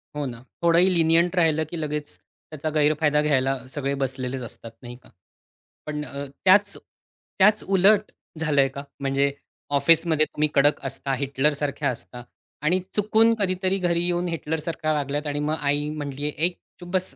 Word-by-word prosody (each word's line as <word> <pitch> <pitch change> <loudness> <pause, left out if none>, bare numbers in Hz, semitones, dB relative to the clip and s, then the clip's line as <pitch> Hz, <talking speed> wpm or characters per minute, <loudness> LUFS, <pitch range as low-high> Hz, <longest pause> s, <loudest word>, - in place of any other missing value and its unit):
हो 145 -1 -2
ना. 120 -2 -7 0.2
थोडंही 170 +2 +5
लिनिएंट 170 0 +3
राहिलं, 160 -3 +3
की 170 - -4
लगेच 150 -1 -3
त्याचा 155 0 -8
गैरफायदा 150 0 +3
घ्यायला 135 -2 +2 0.2
सगळे 140 -1 -2
बसलेलेच 130 0 -3
असतात, 115 - -11
नाही 120 -1 -9
का. - - -19 0.8
पण 150 -1 -4
अ, 140 +1 -6 0.2
त्याच 200 +2 +5 0.6
त्याच 210 +2 +5
उलट 205 +3 +4 0.3
झालंय 145 -3 +3
का? 140 - -4 0.2
म्हणजे 135 +1 +1 0.5
ऑफिसमध्ये 160 +2 +4
तुम्ही 150 0 -1
कडक 145 +2 +3
असता, 135 0 -3
हिटलरसारख्या 140 +1 0
असता 125 0 -8 0.4
आणि 180 +4 +3 0.2
चुकून 220 +2 +4
कधीतरी 185 -1 0
घरी 170 0 +1
येऊन 175 0 0
हिटलरसारख्या 160 -1 -2
वागल्यात 145 0 -2
आणि 145 0 -2
मग 155 - +1
आई 145 +1 +1
म्हणलीये, 145 -1 -4
ए, 160 +3 +1 0.3
चूप 175 -1 -10
बस? 185 0 -1
150 Hz, 150 wpm, -24 LUFS, 140-175 Hz, 0.8 s, थोडंही